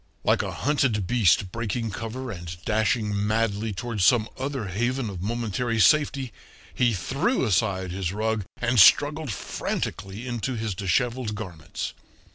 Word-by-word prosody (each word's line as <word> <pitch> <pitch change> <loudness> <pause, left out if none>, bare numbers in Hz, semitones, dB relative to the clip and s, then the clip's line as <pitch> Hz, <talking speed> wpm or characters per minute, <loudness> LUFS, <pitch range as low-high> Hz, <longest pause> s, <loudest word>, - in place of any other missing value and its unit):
Like - - +3
a - - -4
hunted 130 -8 +1
beast 95 -4 +3
breaking 115 0 -2
cover 115 +5 -5
and 85 -3 -7
dashing 110 0 +1
madly 110 0 0
toward 105 +1 -4
some 110 +4 +4
other 135 -3 -3
haven 120 +3 -1
of 90 -3 -7
momentary 115 +2 -1
safety 135 -2 +3 0.4
he 120 -3 +2
threw 135 - 0
aside 95 -3 +1
his 90 -1 -2
rug, 110 +1 -1
and 120 0 +1
struggled 145 +7 +5
frantically 95 +2 -4
into 120 +1 -3
his 110 -3 -2
disheveled 105 +5 0
garments. 85 -6 -6
110 Hz, 135 wpm, -25 LUFS, 100-125 Hz, 0.4 s, struggled